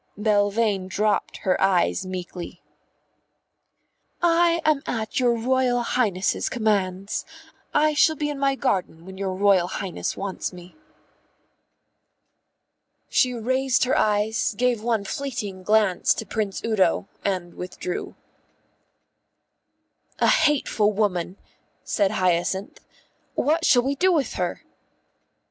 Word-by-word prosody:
Belvane 205 Hz, -1 st, +1 dB
dropped 210 Hz, +2 st, 0 dB
her 185 Hz, -, +1 dB
eyes 190 Hz, 0 st, +2 dB
meekly. 180 Hz, -1 st, -7 dB, 1.6 s
"I 340 Hz, 0 st, +3 dB
am 305 Hz, -3 st, +3 dB
at 220 Hz, 0 st, -2 dB
your 245 Hz, -2 st, +3 dB
Royal 245 Hz, +1 st, +1 dB
Highness's 205 Hz, -7 st, 0 dB
commands. 200 Hz, -4 st, -1 dB, 0.5 s
I 305 Hz, 0 st, +3 dB
shall 315 Hz, +2 st, +4 dB
be 295 Hz, 0 st, -2 dB
in 285 Hz, -, -6 dB
my 275 Hz, -1 st, +2 dB
garden 185 Hz, -10 st, -2 dB
when 190 Hz, 0 st, -10 dB
your 190 Hz, -1 st, -2 dB
Royal 195 Hz, -2 st, +3 dB
Highness 190 Hz, 0 st, -4 dB
wants 195 Hz, -1 st, -4 dB
me." 180 Hz, 0 st, -13 dB, 2.3 s
She 255 Hz, -, +3 dB
raised 260 Hz, +3 st, +1 dB
her 255 Hz, -, +1 dB
eyes, 210 Hz, +1 st, +1 dB
gave 245 Hz, -1 st, +1 dB
one 225 Hz, -3 st, 0 dB
fleeting 210 Hz, -7 st, -4 dB
glance 210 Hz, -2 st, +2 dB
to -, -, -5 dB
Prince 210 Hz, -3 st, -3 dB
Udo, 195 Hz, -4 st, +1 dB, 0.2 s
and 180 Hz, -3 st, -2 dB
withdrew. 180 Hz, 0 st, -6 dB, 2.0 s
"A -, -, +3 dB
hateful 290 Hz, -9 st, +2 dB
woman," 195 Hz, -3 st, -1 dB, 0.5 s
said 200 Hz, -2 st, +1 dB
Hyacinth. 185 Hz, 0 st, -1 dB, 0.6 s
"What 320 Hz, +3 st, +1 dB
shall 245 Hz, -1 st, +5 dB
we 275 Hz, +2 st, 0 dB
do 370 Hz, +7 st, +2 dB
with 305 Hz, -6 st, 0 dB
her?" -, -, -3 dB
210 Hz, 115 wpm, -24 LUFS, 190-255 Hz, 2.3 s, shall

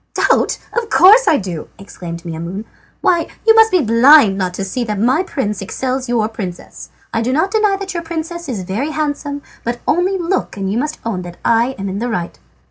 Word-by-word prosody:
"Doubt! -, -, +2 dB, 0.2 s
Of 470 Hz, -2 st, -2 dB
course 435 Hz, +7 st, +6 dB
I 310 Hz, -, +5 dB
do!" 180 Hz, -, -5 dB
exclaimed 170 Hz, -4 st, -8 dB
Maimoune. 170 Hz, +5 st, -5 dB, 0.4 s
"Why, 340 Hz, -2 st, +2 dB, 0.2 s
you 450 Hz, -, +7 dB
must 445 Hz, 0 st, +6 dB
be 365 Hz, -6 st, +2 dB
blind 230 Hz, -1 st, +6 dB
not 185 Hz, -2 st, -2 dB
to 195 Hz, -, -3 dB
see 240 Hz, +6 st, -2 dB
how 215 Hz, -3 st, -3 dB
much 205 Hz, +3 st, 0 dB
my 260 Hz, +7 st, +3 dB
prince 210 Hz, -, -3 dB
excels 260 Hz, +5 st, -3 dB
your 230 Hz, -3 st, +1 dB
princess. 195 Hz, -6 st, -8 dB, 0.2 s
I 225 Hz, -, 0 dB
do 240 Hz, +2 st, -1 dB
not 320 Hz, +9 st, +1 dB
deny 425 Hz, -2 st, +2 dB
that 390 Hz, -1 st, -5 dB
your 340 Hz, -, -3 dB
princess 335 Hz, 0 st, -5 dB
is 210 Hz, -7 st, -3 dB
very 210 Hz, +11 st, -2 dB
handsome, 290 Hz, -2 st, -3 dB, 0.2 s
but 235 Hz, +1 st, -2 dB
only 365 Hz, +4 st, +1 dB
look 350 Hz, -, -2 dB
and 195 Hz, -1 st, -2 dB
you 220 Hz, -, 0 dB
must 300 Hz, +3 st, -3 dB
own 210 Hz, -6 st, -2 dB
that 175 Hz, -1 st, -9 dB
I 235 Hz, +3 st, +2 dB
am 195 Hz, -, -4 dB
in 195 Hz, +1 st, -3 dB
the 240 Hz, +2 st, -2 dB
right." 175 Hz, -7 st, -4 dB
245 Hz, 215 wpm, -17 LUFS, -, 0.4 s, you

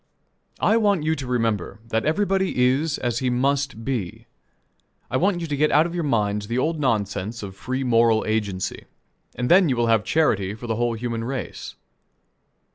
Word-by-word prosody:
I 220 Hz, -, +3 dB
want 205 Hz, -7 st, +2 dB
you 160 Hz, +1 st, +1 dB
to 135 Hz, -4 st, -6 dB
remember 115 Hz, -5 st, -1 dB
that 110 Hz, 0 st, 0 dB
everybody 190 Hz, 0 st, +1 dB
is 145 Hz, +4 st, +1 dB
as 120 Hz, -1 st, -1 dB
he 130 Hz, -, 0 dB
must 135 Hz, -1 st, 0 dB
be. 115 Hz, -10 st, -3 dB, 0.9 s
I 130 Hz, -, +2 dB
want 180 Hz, +2 st, +1 dB
you -, -, -2 dB
to 150 Hz, -3 st, -2 dB
get 150 Hz, +2 st, +2 dB
out 155 Hz, +2 st, +4 dB
of 170 Hz, -, -4 dB
your 175 Hz, -1 st, -2 dB
minds 105 Hz, -6 st, 0 dB
the 120 Hz, +2 st, -2 dB
old 160 Hz, +4 st, 0 dB
nonsense 110 Hz, -3 st, -1 dB
of 95 Hz, -1 st, -7 dB
"free 130 Hz, +6 st, -3 dB
moral 115 Hz, -2 st, +3 dB
agency;" 105 Hz, -4 st, -2 dB, 0.5 s
and 125 Hz, -, -2 dB
then 180 Hz, +1 st, +5 dB
you 130 Hz, -, +1 dB
will 120 Hz, -1 st, +1 dB
have 110 Hz, -2 st, +2 dB
charity 105 Hz, -12 st, +1 dB
for 115 Hz, -, -9 dB
the 110 Hz, -2 st, -2 dB
whole 120 Hz, -1 st, 0 dB
human 115 Hz, 0 st, -3 dB
race. 120 Hz, -, -5 dB
125 Hz, 185 wpm, -23 LUFS, 110-150 Hz, 0.9 s, then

